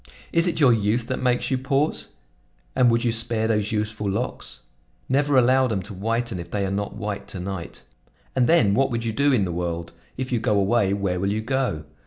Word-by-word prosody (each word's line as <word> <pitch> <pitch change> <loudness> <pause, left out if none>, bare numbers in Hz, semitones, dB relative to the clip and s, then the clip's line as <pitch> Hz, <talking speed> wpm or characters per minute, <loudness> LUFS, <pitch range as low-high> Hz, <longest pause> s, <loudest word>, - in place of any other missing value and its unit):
Is 165 +1 +4
it 175 - 0
your 135 -5 +6
youth 110 +2 +1
that 130 - -2
makes 125 0 +1
you 130 - +1
pause? 140 +3 0 0.7
And 125 - +5
would 115 0 +2
you 120 - +2
spare 115 -1 0
those 105 -2 0
youthful 105 -1 -2
locks? 110 +6 -3 0.5
Never 140 +1 +2
allow 130 +1 +4
them 100 -6 -2
to 105 +2 -9
whiten 115 +1 -2
if 85 - -7
they 100 -2 -1
are 95 - -2
not 100 +1 -3
white 105 -1 -4
to 95 - -5
night. 95 -1 -6 0.5
"And 125 -2 +3
then 120 -12 +5
what 135 +5 +2
would 115 -1 -2
you 110 - -1
do 140 +4 +3
in 110 -7 +3
the 90 - -3
world? 85 -1 -3 0.3
If 130 0 -4
you 120 - +1
go 105 -3 +2
away, 100 0 +2
where 100 -3 -1
will 100 +2 0
you 110 +1 -1
go? 125 - -1
115 Hz, 220 wpm, -24 LUFS, 100-125 Hz, 0.7 s, your